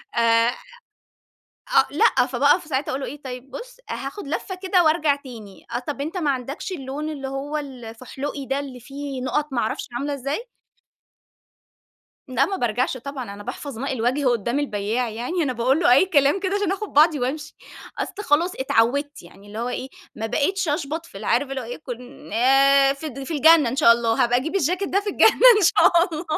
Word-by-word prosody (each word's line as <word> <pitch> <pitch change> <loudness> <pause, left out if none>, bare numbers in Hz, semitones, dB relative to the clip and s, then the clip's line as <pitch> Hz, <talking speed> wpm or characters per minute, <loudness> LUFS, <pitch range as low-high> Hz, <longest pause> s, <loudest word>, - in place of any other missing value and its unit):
آآ، 230 0 +4 1.3
آه - - +6
لأ، - - +3
فباقف - - +3
في - - -15
ساعتها 270 +1 -1
أقول 270 - -3
له - - -4
إيه: 290 +2 -8
"طيب 255 +1 -8
بُص - - -9
هاخد 280 +6 -6
لفَّة 365 +5 -4
كده 370 -1 +3
وأرجع 310 -2 +3
تاني، 230 -8 -12
آه - - 0
طَب 275 +2 -5
أنتَ 320 +6 -4
ما 315 -5 0
عندكش 270 +8 -5
اللون 285 -1 -5
اللي 280 -3 -5
هو 275 +3 -4
ال 270 -5 -7
الفُحْلُقي 265 +5 -6
ده 270 +1 -1
اللي 270 -3 -7
فيه 275 +1 -7
نقط 290 +4 -1
ما 240 - 0
أعرفش 220 - -3
عاملة 285 +3 -3
إزاي؟" 280 - -4 1.8
لأ، 260 +2 +2
ما 390 - -3
بارجعش 245 - -1
طبعًا 255 -4 -7
أنا 205 - -10
باحفظ 250 +2 -7
ماء 275 +3 -2
الوجه 255 +3 0
قدَّام 240 +2 +1
البيّاع 230 -2 -1
يعني، 245 +11 -3
أنا 275 -4 0
باقول 255 +5 +1
له 290 - +5
أي 275 +9 +5
كلام 290 +1 +3
كده 380 +1 -1
عشان 405 -2 0
أخد 410 +2 -5
بعضي 300 0 +4
وأمشي 295 +5 -3 0.4
أصل - - -3
خلاص 335 +4 +2
اتعوِّدت 270 +3 0
يعني 195 +4 -16
اللي 210 +1 -9
هو 235 +2 -2
إيه 255 +1 -4 0.3
ما 220 - -4
بقيتش 340 - 0
أشْبَط 305 +2 -2
في - - -20
اللي 200 +2 -7
عارف 270 +3 +1
اللي 270 -1 -3
هو - - -7
إيه 240 +2 -6
كن 250 -5 -10
آآ، 270 +3 +5
ف 275 - -13
في 275 +2 -5
الجنة 310 -2 +6
إن 245 - -3
شاء 275 -5 +7
الله. 230 -1 +1
هابقى 245 +1 +2
أجيب 320 +8 -4
الجاكيت 365 +3 0
ده 395 - +1
في 410 0 -3
الجنة - - +5 0.3
إن 420 - +2
شاء 340 0 +5
الله 315 +2 -4
275 Hz, 200 wpm, -23 LUFS, 245-305 Hz, 1.8 s, شاء